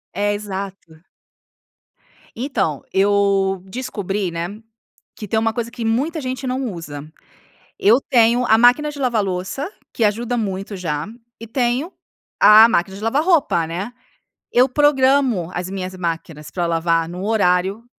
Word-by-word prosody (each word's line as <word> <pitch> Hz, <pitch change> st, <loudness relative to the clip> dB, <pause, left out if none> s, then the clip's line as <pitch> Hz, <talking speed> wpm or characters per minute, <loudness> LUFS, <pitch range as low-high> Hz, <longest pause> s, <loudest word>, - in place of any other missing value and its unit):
É. 205 Hz, 0 st, +1 dB
Exato. 195 Hz, -5 st, -7 dB, 1.3 s
Então, 235 Hz, -, -2 dB
eu 195 Hz, -1 st, +2 dB
descobri, 205 Hz, -4 st, -3 dB
né, 175 Hz, +6 st, -5 dB, 0.5 s
que 210 Hz, -, -7 dB
tem 220 Hz, +3 st, +1 dB
uma 225 Hz, 0 st, 0 dB
coisa 235 Hz, -1 st, -4 dB
que 235 Hz, -2 st, -5 dB
muita 280 Hz, +9 st, 0 dB
gente 260 Hz, +1 st, -4 dB
não 255 Hz, -4 st, -2 dB
usa. 150 Hz, -3 st, -8 dB, 0.7 s
Eu 230 Hz, +6 st, +4 dB
tenho 240 Hz, 0 st, +4 dB
a 220 Hz, +1 st, +5 dB
máquina 250 Hz, +6 st, +4 dB
de 290 Hz, -, -10 dB
lavar 240 Hz, -5 st, +1 dB
louça, 190 Hz, -, -4 dB, 0.2 s
que 230 Hz, -, -4 dB
ajuda 235 Hz, +4 st, 0 dB
muito 195 Hz, -2 st, -3 dB
já, 155 Hz, -4 st, -3 dB, 0.3 s
e 230 Hz, -, -8 dB
tenho 250 Hz, -, -1 dB, 0.5 s
a 220 Hz, +2 st, +9 dB
máquina 190 Hz, -2 st, 0 dB
de 205 Hz, -, -10 dB
lavar 270 Hz, +7 st, +1 dB
roupa, 290 Hz, -, +2 dB
né. 190 Hz, +8 st, -5 dB, 0.6 s
Eu 250 Hz, +2 st, +5 dB
programo 265 Hz, -, +2 dB
as 180 Hz, +1 st, -4 dB
minhas 185 Hz, -1 st, -5 dB
máquinas 165 Hz, -3 st, -5 dB
pra 175 Hz, -2 st, -2 dB
lavar 165 Hz, 0 st, +1 dB
num 180 Hz, +2 st, -7 dB
horário 200 Hz, 0 st, +1 dB
205 Hz, 145 wpm, -20 LUFS, 180-245 Hz, 1.3 s, a